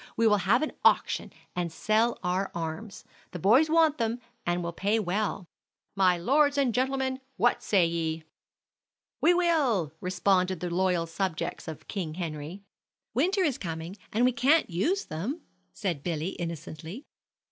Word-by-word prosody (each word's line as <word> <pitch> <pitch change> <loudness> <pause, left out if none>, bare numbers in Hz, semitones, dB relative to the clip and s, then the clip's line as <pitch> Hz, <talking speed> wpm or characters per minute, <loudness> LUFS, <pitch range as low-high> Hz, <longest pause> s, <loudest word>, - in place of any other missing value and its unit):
We 230 - +3
will 210 -2 +5
have 200 +9 +2
an 310 - -2
auction - - +3 0.2
and 175 -2 -2
sell 220 +7 +1
our 185 +2 0
arms. 170 +5 -5 0.3
The - - -3
boys 230 - +4
want 320 -3 +4
them, 230 +1 0 0.3
and 175 0 0
will 170 0 -3
pay 205 +5 +1
well. 205 -1 -1 0.5
My 185 -2 +4
lords 285 - +3
and 265 -4 +2
gentlemen, 260 +1 0 0.2
what 245 - +2
say 190 -5 +3
ye?" 165 -1 -2 1.0
"We 350 +2 +5
will!" 275 - +2
responded 185 0 +1
the 175 +1 -3
loyal 180 -2 +1
subjects 170 0 -3
of 160 -1 -8
King 170 -7 -4
Henry. 165 +2 -5 0.5
"Winter 370 - +2
is 290 -7 0
coming, 165 0 -5 0.2
and 235 +3 +2
we 255 - +4
can't 260 - +3
use 335 - 0
them," 220 - -4 0.3
said 180 -9 -3
Billy, 165 +1 -2
innocently. 165 - -6
195 Hz, 150 wpm, -28 LUFS, 170-250 Hz, 1.0 s, will